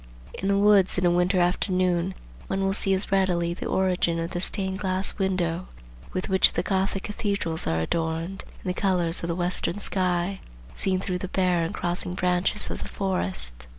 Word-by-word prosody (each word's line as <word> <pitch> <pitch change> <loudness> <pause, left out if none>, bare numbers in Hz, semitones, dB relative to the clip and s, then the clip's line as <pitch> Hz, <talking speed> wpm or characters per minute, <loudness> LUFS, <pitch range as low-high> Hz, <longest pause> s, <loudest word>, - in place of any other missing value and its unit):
In 195 - -3
the 200 0 +3
woods 200 -2 +4
in 180 - +1
a 175 - +5
winter 180 +2 +2
afternoon 180 0 +1 0.3
one 195 0 -1
will 195 0 +1
see 195 -1 -1
as 190 +2 0
readily 180 -3 +2
the - - -5
origin 180 -3 +1
of 165 +1 -3
the 175 - -3
stained 190 0 -2
glass 190 0 0
window, 185 -2 0 0.4
with 185 - -3
which 190 0 +5
the - - 0
Gothic 195 0 0
cathedrals 200 -6 -2
are 80 0 +1
adorned, 165 - -2 0.2
in - - -4
the 180 - +1
colors 180 -3 +1
of 170 - -3
the 170 - -1
western 175 +1 -1
sky 185 -1 0 0.3
seen 190 -1 0
through 185 -1 -2
the 185 - -4
bare 180 -2 +1
and 165 - -2
crossing 175 +1 -2
branches 180 +3 +1
of - - -5
the - - -5
forest. 65 - -2
185 Hz, 185 wpm, -26 LUFS, 175-190 Hz, 0.4 s, a